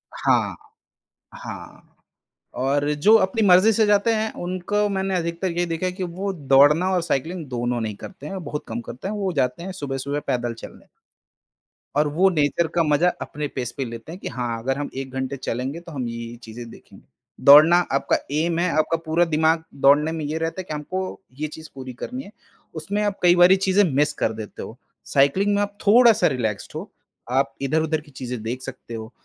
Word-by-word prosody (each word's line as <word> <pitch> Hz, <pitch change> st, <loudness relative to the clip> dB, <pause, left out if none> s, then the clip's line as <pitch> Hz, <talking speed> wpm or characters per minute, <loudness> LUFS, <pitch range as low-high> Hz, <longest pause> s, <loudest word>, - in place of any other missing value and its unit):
हाँ, -, -, +1 dB, 0.8 s
हाँ। -, -, -10 dB, 0.7 s
और 140 Hz, +3 st, 0 dB
जो 180 Hz, +10 st, +5 dB
अपनी 190 Hz, +3 st, 0 dB
मर्ज़ी 185 Hz, +4 st, +6 dB
से 220 Hz, +1 st, +3 dB
जाते 205 Hz, +2 st, +3 dB
हैं 220 Hz, 0 st, -1 dB
उनको 185 Hz, +4 st, -1 dB
मैंने 195 Hz, -1 st, -1 dB
अधिकतर 170 Hz, +2 st, -2 dB
ये 175 Hz, -, +2 dB
देखा 165 Hz, +2 st, -2 dB
है 180 Hz, -, -1 dB
कि 185 Hz, -, -6 dB
वो 185 Hz, +3 st, -4 dB
दौड़ना 145 Hz, +2 st, +4 dB
और 180 Hz, -2 st, +1 dB
साइकिलिंग 165 Hz, +2 st, -2 dB
दोनों 120 Hz, -1 st, -2 dB
नहीं 110 Hz, -2 st, -3 dB
करते 185 Hz, -, -10 dB
हैं 190 Hz, -1 st, -5 dB
बहुत 150 Hz, 0 st, -5 dB
कम 115 Hz, +1 st, -4 dB
करते 125 Hz, +8 st, -7 dB
हैं। 210 Hz, -, -3 dB
वो 195 Hz, -3 st, -2 dB
जाते 130 Hz, 0 st, -1 dB
हैं 190 Hz, +2 st, -5 dB
सुबह-सुबह 140 Hz, -3 st, -3 dB
पैदल 120 Hz, -1 st, -1 dB
चलने, -, -, -12 dB, 1.1 s
और 150 Hz, +1 st, +3 dB
वो 175 Hz, +6 st, +3 dB
नेचर 160 Hz, 0 st, +1 dB
का 170 Hz, -, +3 dB
मज़ा 155 Hz, +3 st, +3 dB
अपने 150 Hz, 0 st, -4 dB
पेस 125 Hz, -2 st, -3 dB
पे 135 Hz, -, -2 dB
लेते 115 Hz, +5 st, -8 dB
हैं 180 Hz, -, -8 dB
कि -, -, -5 dB
हाँ 120 Hz, -2 st, -3 dB
अगर 135 Hz, +3 st, -1 dB
हम 145 Hz, -, -3 dB
1 135 Hz, 0 st, -5 dB
घंटे 130 Hz, +1 st, -3 dB
चलेंगे 130 Hz, +5 st, -4 dB
तो 170 Hz, -1 st, -12 dB
हम 130 Hz, -5 st, -3 dB
ये-ये 115 Hz, 0 st, -6 dB
चीजें 115 Hz, +1 st, -9 dB
देखेंगे। -, -, -16 dB, 0.4 s
दौड़ना 155 Hz, +5 st, +9 dB, 0.2 s
आपका 135 Hz, -, +2 dB
एम 165 Hz, +3 st, 0 dB
है, 180 Hz, +1 st, +1 dB
आपका 155 Hz, +1 st, +2 dB
पूरा 165 Hz, +2 st, +2 dB
दिमाग 160 Hz, 0 st, +2 dB, 0.2 s
दौड़ने 145 Hz, +3 st, +5 dB
में 160 Hz, -1 st, -4 dB
ये 155 Hz, +2 st, -2 dB
रहता 165 Hz, +3 st, -3 dB
है -, -, -9 dB
कि 165 Hz, -, -7 dB
हमको 185 Hz, +7 st, -4 dB, 0.2 s
ये 155 Hz, -, -1 dB
चीज़ 160 Hz, +1 st, -11 dB
पूरी 130 Hz, -1 st, -7 dB
करनी 250 Hz, -, -6 dB
है 200 Hz, -, -13 dB, 0.4 s
उसमें 195 Hz, +7 st, -2 dB
आप 205 Hz, -1 st, -1 dB
कई 175 Hz, 0 st, +6 dB
बारी 175 Hz, +2 st, +7 dB
चीज़ें 195 Hz, +1 st, +3 dB
मिस 150 Hz, +2 st, +2 dB
कर 110 Hz, -, -1 dB
देते 110 Hz, -1 st, -8 dB
हो 115 Hz, -, -9 dB, 0.3 s
साइकिलिंग 150 Hz, +9 st, +2 dB
में 200 Hz, -, +1 dB
आप 205 Hz, 0 st, -3 dB
थोड़ा-सा 230 Hz, 0 st, +6 dB
रिलैक्स्ड 115 Hz, -7 st, -2 dB
हो। -, -, -6 dB, 0.4 s
आप 135 Hz, +2 st, +1 dB
इधर-उधर 155 Hz, +3 st, 0 dB
की 150 Hz, -1 st, -19 dB
चीजें 125 Hz, -3 st, -6 dB
देख 120 Hz, +3 st, -4 dB
सकते 130 Hz, -3 st, -9 dB
हो 110 Hz, 0 st, -7 dB
155 Hz, 200 wpm, -23 LUFS, 130-185 Hz, 1.1 s, दौड़ना